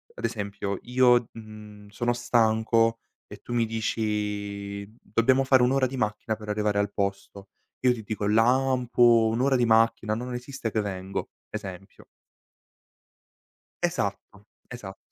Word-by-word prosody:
ad - - -4
esempio, 100 -2 -3
io, 125 -1 +3
mhmm, 105 -2 -12
sono 120 +4 -1
stanco 115 -1 +2 0.3
e - - -10
tu 120 - -8
mi 115 -1 +2
dici: 105 -3 -3
"Dobbiamo 130 +5 +2
fare 130 -2 +5
un'ora 130 +1 +3
di 130 - -7
macchina 110 -2 -2
per 105 -1 -10
arrivare 105 -1 0
al 100 0 0
posto". 100 0 -4 0.4
Io 125 -1 +5
ti 110 -3 -8
dico: 105 -1 -3
"Lampo, 120 0 +4
un'ora 130 +4 +2
di 125 -1 +3
macchina, 115 -1 +3
non 125 +3 -4
esiste 125 -1 -5
che 110 - 0
vengo", 95 -1 -4 0.2
esempio. 95 0 -8 1.8
Esatto, - - 0 0.5
esatto. 105 -6 -9
110 Hz, 130 wpm, -26 LUFS, 105-120 Hz, 1.8 s, fare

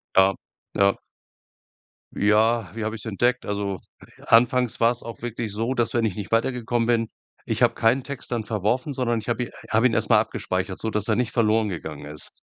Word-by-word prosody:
Ja, 95 +1 +6 0.4
ja. 100 0 +2 1.1
Ja, 110 0 +2
wie 115 - -4
habe 110 +1 -2
ich's 105 - -9
entdeckt? 120 +4 0
Also, 100 -2 -3 0.5
anfangs 120 +1 +3
war's 120 +1 +3
auch 115 - -9
wirklich 115 -3 -4
so, 115 +5 -1
dass 120 -3 0
wenn 120 - +1
ich 105 -5 -1
nicht 105 0 -6
weitergekommen 120 0 0
bin 115 -1 +2 0.4
ich - - +1
habe - - +4
keinen 125 +4 +2
Text 140 -2 -3
dann 115 -3 -2
verworfen, 115 +7 -1
sondern 125 -3 0
ich 110 - -6
habe 120 +1 -1
i - - -11 0.2
habe 115 +4 +4
ihn 115 - -2
erst - - +1
mal - - +7
abgespeichert, 95 +1 -3
sodass 105 -2 -1
er 110 - +2
nicht 120 0 0
verloren 110 -2 +2
gegangen 80 -5 -6
ist. 75 +1 0
115 Hz, 190 wpm, -24 LUFS, 105-120 Hz, 1.1 s, mal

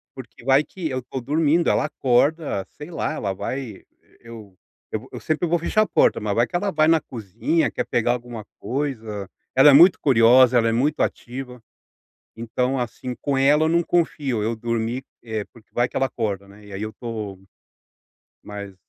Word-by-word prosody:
Porque 125 -2 -12
vai 135 +2 +4
que 165 -1 -6
eu 130 - -2
estou 130 +1 -6
dormindo, 155 +5 +2
ela - - +2
acorda, 135 - +1
sei 150 +3 -10
lá, 165 - -2
ela 100 -10 -3
vai, 120 +1 -5 0.4
eu 110 -5 -12 0.4
vo - - -4
eu - - -7
sempre 155 +3 -1
vou 170 +1 +1
fechar 215 +6 +1
a 215 - +3
porta, - - +2
mas 105 -1 -1
vai 120 +3 +2
que - - -8
ela 200 +2 0
vai 155 -2 +3
na 165 -2 +4
cozinha, 115 - -1
quer - - -3
pegar 120 0 +1
alguma 120 -3 -7
coisa, 110 -8 -4 0.2
ela 135 +3 +7
é - - +5
muito 170 +6 +7
curiosa, 125 -1 +5
ela 115 -1 +3
é - - +1
muito 140 +7 0
ativa. 125 -1 -4 0.7
Então 125 +3 -1
assim, 125 +1 -4
com 140 -2 0
ela 145 +3 +4
eu 160 - +2
não 170 +1 +3
confio, 145 -10 0
eu 115 - 0
dormi, 115 +2 -2 0.2
eh, 110 -3 -4
porque 115 -2 -19
vai 120 0 +2
que - - -20
ela 135 - +2
acorda, 100 -5 -4
né. 105 +1 -16
E 105 - -12
aí 95 - -5
eu 110 - -3
estou, 110 -5 -6 1.0
mas, 100 -1 -8
125 Hz, 190 wpm, -22 LUFS, 110-145 Hz, 1.0 s, ela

